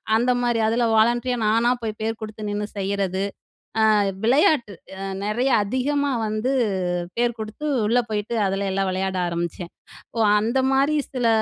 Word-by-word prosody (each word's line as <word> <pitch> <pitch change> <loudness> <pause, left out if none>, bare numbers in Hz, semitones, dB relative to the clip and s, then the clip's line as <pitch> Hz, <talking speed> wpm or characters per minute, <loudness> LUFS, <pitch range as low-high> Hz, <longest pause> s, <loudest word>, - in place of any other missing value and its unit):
அந்தமாரி, 245 0 +1
அதுல 235 +1 +1
வாலண்டரியா 240 +3 +2
நானா 230 +3 +3
போய் 220 -1 -4
பேர 220 +1 0
குடுத்து 215 -1 -6
நின்னு 205 0 -2
செய்றது. 195 -1 -1 0.7
அ - - +4 0.3
விளையாட்டு 245 -3 +3 0.3
அ - - -5 0.2
நிறையா 245 +5 +1
அதிகமா 280 +5 0 0.2
வந்து 215 +4 -1 0.7
பேர் 240 -1 +1
குடுத்து 220 +7 -6 0.2
உள்ள 245 +2 +3
போயிட்டு 215 +2 -2
அதுல 195 0 -1
எல்லாம் 195 0 0
விளையாட 190 0 -2
ஆரம்பிச்சன். 170 0 -4 0.5
ஓ - - 0 0.2
அந்த 235 +5 0
மாரி 280 +3 +2 0.2
சில 245 -3 +1
220 Hz, 140 wpm, -23 LUFS, 200-245 Hz, 0.7 s, அ